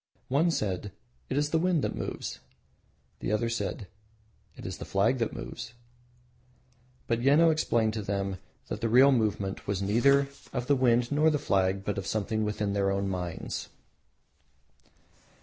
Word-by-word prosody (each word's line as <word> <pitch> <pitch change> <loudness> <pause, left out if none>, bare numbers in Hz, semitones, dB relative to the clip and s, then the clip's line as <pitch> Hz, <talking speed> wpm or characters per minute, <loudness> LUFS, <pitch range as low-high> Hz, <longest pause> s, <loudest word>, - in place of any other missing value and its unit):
One 145 +6 +3
said 105 - -2 0.4
"It 130 - -1
is 145 +1 +1
the 160 - +3
wind 175 -3 +1
that - - -1
moves," - - -5 0.8
the - - -3
other 105 +2 +1
said 115 -2 -3 0.7
"It - - -10
is - - -5
the - - -5
flag 110 +7 +1
that 115 - 0
moves"; 115 - -7 1.3
but 115 0 0
Yeno 150 +6 +5
explained 115 -8 +1
to 110 - -3
them 100 -1 -2 0.3
that 105 - -5
the 115 - 0
real 130 +4 +7
movement 105 -5 -1
was 100 -2 -1
neither 135 +8 +3 0.3
of 125 -2 -2
the 145 - +3
wind 120 -1 +2
nor 150 +2 +4
the 150 - +1
flag, 95 -7 0
but 105 -1 -1
of 95 - -6
something 110 +1 -1
within 105 -1 -1
their 100 -1 +1
own 100 0 0
minds. 90 -2 -4
110 Hz, 160 wpm, -29 LUFS, 100-135 Hz, 1.3 s, real